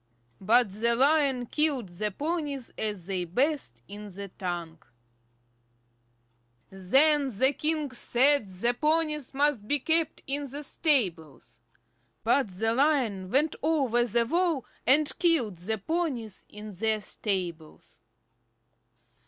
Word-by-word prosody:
But 225 +2 +3
the 235 +4 +1
Lion 275 -1 +2
killed 285 -4 +1
the 200 +5 -3
ponies 290 - -4
as 210 -5 -3
they 190 -1 -2
bathed 185 - -2
in 210 +1 -9
the 200 +1 -8
tank. 175 -3 -6 1.9
Then 275 +10 +3
the 260 +3 +2
king 305 -1 -1
said 255 0 +2
the 195 +6 0
ponies 300 0 0
must 280 -6 0
be 290 - +2
kept 320 +3 0
in 280 0 -3
the 290 +3 -6
stables. 165 - -1 0.6
But 240 +2 +2
the 215 +4 -1
Lion 245 -9 +1
went 290 +7 +1
over 275 -6 +2
the 235 0 +1
wall, 330 -2 0 0.2
and 290 +3 +4
killed 310 - +2
the 210 +6 -2
ponies 250 - -3
in 210 0 -9
their 215 +3 0
stables. 175 - -5
240 Hz, 120 wpm, -27 LUFS, 195-290 Hz, 1.9 s, and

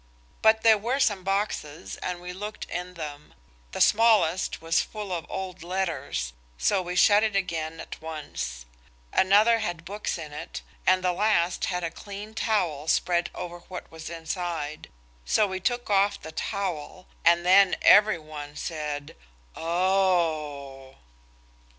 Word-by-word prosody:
But 220 0 +5
there 220 -2 +6
were 245 +6 -1
some 205 -8 +2
boxes 190 -5 -2
and 180 -1 -4
we 180 0 -6
looked 210 +3 -6
in 180 +1 -5
them. 150 -3 -8 0.4
The - - -5
smallest 210 -6 +4
was 165 0 +2
full 210 -3 -6
of 170 -2 -4
old 185 -2 -5
letters, 165 - -2 0.2
so - - +2
we 180 0 -5
shut 205 +3 +6
it 215 -2 0
again 165 -4 -2
at - - -8
once. 155 - -5 0.5
Another 210 +4 +5
had 175 -6 -4
books 205 0 -3
in 155 -3 -8
it, 150 - -7 0.2
and 185 0 +4
the 180 -1 +2
last 180 -3 +2
had 180 -1 -2
a 165 - -2
clean 205 +4 -9
towel 180 -10 0
spread 175 +1 +2
over 175 0 -6
what 185 - -8
was 160 0 -8
inside. 165 -2 -4 0.3
So 215 - +3
we 190 -1 -3
took 245 +5 -1
off 200 0 +3
the 160 - -9
towel, 185 -1 -4 0.2
and 170 +1 +4
then 190 +1 +6
every 210 -2 +7
one 150 -2 -9
said 150 -3 -4 0.4
"Oh!" 160 -7 0
180 Hz, 145 wpm, -26 LUFS, 160-200 Hz, 0.5 s, every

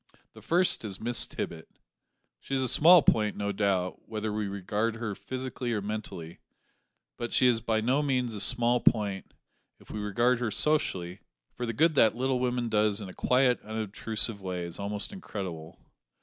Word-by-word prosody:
The - - -14
first 175 -4 +2
is, 100 -3 -6
Miss 120 +2 0
Tippet. 80 -1 -6 0.7
She 135 - -4
is 130 - +1
a - - +1
small 165 +6 +7
point, 105 -2 +2
no 100 0 -1
doubt, 95 -3 -1
whether 110 -1 -3
we 105 -1 -2
regard 105 +3 -2
her 115 -2 -4
physically 130 +1 -5
or 105 - 0
mentally, 100 -5 -6 0.8
but 120 0 -4
she - - +4
is 120 -2 +3
by 110 -1 0
no 130 +6 +2
means 130 -5 0
a 105 - -3
small 120 0 +3
point 100 -5 +1 0.5
if - - -15
we 105 - -5
regard 120 +4 +1
her 120 -2 -1
socially, 100 - +1 0.3
for 120 - -4
the - - -1
good 160 +7 +3
that 115 -6 +4
that - - -13
little 130 0 +1
woman 125 -1 -1
does 105 -1 +1
in 100 -3 -7
a - - -10
quiet, 125 -1 +2
unobtrusive 110 0 -2
way 90 -2 -4
is 85 +2 -6
almost 105 - -3
incredible. 90 - -7
110 Hz, 180 wpm, -28 LUFS, 100-125 Hz, 0.8 s, small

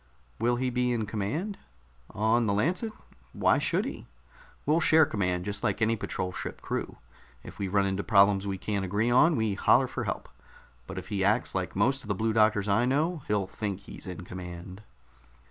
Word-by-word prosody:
"Will 120 +1 +2
he 125 +1 -1
be 125 0 +1
in 115 -3 0
command?" 110 - -3 0.5
"On 110 +2 +1
the 100 - +2
Lancet? 175 - 0 0.4
Why - - +3
should - - 0
he? - - -7 0.6
We'll 155 +3 +3
share 160 -1 +5
command, 90 -6 -1
just 105 0 -3
like 105 - 0
any 115 0 +2
patrol 95 -3 -3
ship - - -6
crew. - - -4 0.5
If - - -11
we 100 - -1
run 100 +1 +2
into 95 0 -1
problems 100 -1 +4
we 95 -1 -2
can't 100 0 -2
agree 105 +5 0
on, 150 +6 +5
we 110 -3 0
holler - - +4
for - - -4
help. - - -3 0.6
But - - -7
if 90 0 -6
he 100 -3 -1
acts 105 +5 +2
like 95 -2 -3
most 130 +7 +2
of - - -12
the 100 - 0
Blue 110 +3 0
Doctors 110 -2 +3
I 105 +4 +3
know, 155 +6 0
he'll 105 -2 +1
think 100 0 -4
he's 100 - -11
in 90 0 -6
command." 90 +1 -8
105 Hz, 195 wpm, -28 LUFS, 95-120 Hz, 0.6 s, share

